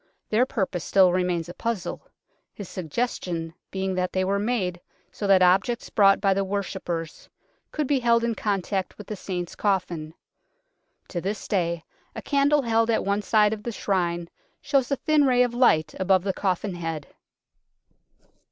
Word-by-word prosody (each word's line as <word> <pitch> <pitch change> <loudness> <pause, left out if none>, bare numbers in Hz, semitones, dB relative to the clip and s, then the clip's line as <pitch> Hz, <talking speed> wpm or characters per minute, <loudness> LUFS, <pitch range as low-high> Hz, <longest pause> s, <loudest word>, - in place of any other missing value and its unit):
Their 235 +4 +3
purpose 190 - -2
still 190 -2 +5
remains 180 -2 0
a 175 - -8
puzzle, 230 -3 -4 0.5
his 205 - -7
suggestion 170 -2 -3 0.2
being 190 0 -2
that 185 0 -1
they 185 - +1
were 200 +1 +1
made 200 -6 -1 0.3
so 205 - -4
that 190 -2 +6
objects 195 +7 +2
brought 195 -2 +5
by 195 -1 +3
the 195 +1 0
worshippers 190 -4 -4 0.4
could 300 - -1
be 275 0 +2
held 235 -1 +3
in 235 0 +1
contact 195 -2 -2
with 210 - -9
the 215 - -5
Saint's 180 -3 -5
coffin. 175 -6 -1 0.9
To 175 - -3
this 200 +3 -4
day 170 -4 0 0.3
a - - -5
candle 285 0 +3
held 230 -1 +2
at 225 - +1
one 200 +1 +1
side 210 +1 +3
of 215 - -6
the 235 - -4
Shrine 175 -5 -1 0.3
shows 270 -4 +1
a 280 - +2
thin 305 -1 +2
ray 250 -2 +4
of 245 -1 -1
light 200 - +3
above 190 -1 +3
the 195 -1 -1
coffin 190 0 -1
head. 165 -4 -5
195 Hz, 165 wpm, -25 LUFS, 180-230 Hz, 0.9 s, that